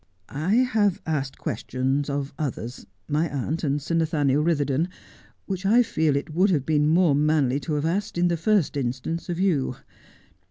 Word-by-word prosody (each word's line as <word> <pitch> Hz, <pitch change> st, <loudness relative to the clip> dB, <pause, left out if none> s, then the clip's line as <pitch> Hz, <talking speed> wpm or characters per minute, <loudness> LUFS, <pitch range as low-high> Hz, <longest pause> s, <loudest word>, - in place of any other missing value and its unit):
I 160 Hz, +9 st, 0 dB
have 220 Hz, -6 st, +2 dB
asked 140 Hz, -4 st, -2 dB
questions 135 Hz, +3 st, -2 dB
of 140 Hz, 0 st, -3 dB
others 125 Hz, -4 st, -5 dB
— -, -, -43 dB
my 155 Hz, +2 st, 0 dB
aunt 145 Hz, +4 st, -3 dB
and 145 Hz, -1 st, +1 dB
Sir 150 Hz, +4 st, -5 dB
Nathaniel 150 Hz, -3 st, +2 dB
Ritherdon 150 Hz, -1 st, +1 dB, 0.3 s
— -, -, -29 dB
which 190 Hz, -1 st, -4 dB
I 230 Hz, +5 st, +5 dB
feel 160 Hz, -9 st, +1 dB
it 145 Hz, +2 st, -3 dB
would 185 Hz, +5 st, +3 dB
have 150 Hz, -7 st, +1 dB
been 150 Hz, -1 st, +2 dB
more 165 Hz, -1 st, +4 dB
manly 145 Hz, -2 st, +2 dB
to 150 Hz, +3 st, -4 dB
have 145 Hz, +1 st, -1 dB
asked, 195 Hz, +4 st, -1 dB
in 175 Hz, +1 st, +3 dB
the 170 Hz, -, +1 dB
first 180 Hz, -1 st, +1 dB
instance, 135 Hz, +6 st, -3 dB
of 175 Hz, 0 st, -2 dB
you. 155 Hz, -10 st, +1 dB
155 Hz, 185 wpm, -25 LUFS, 140-175 Hz, 0.3 s, I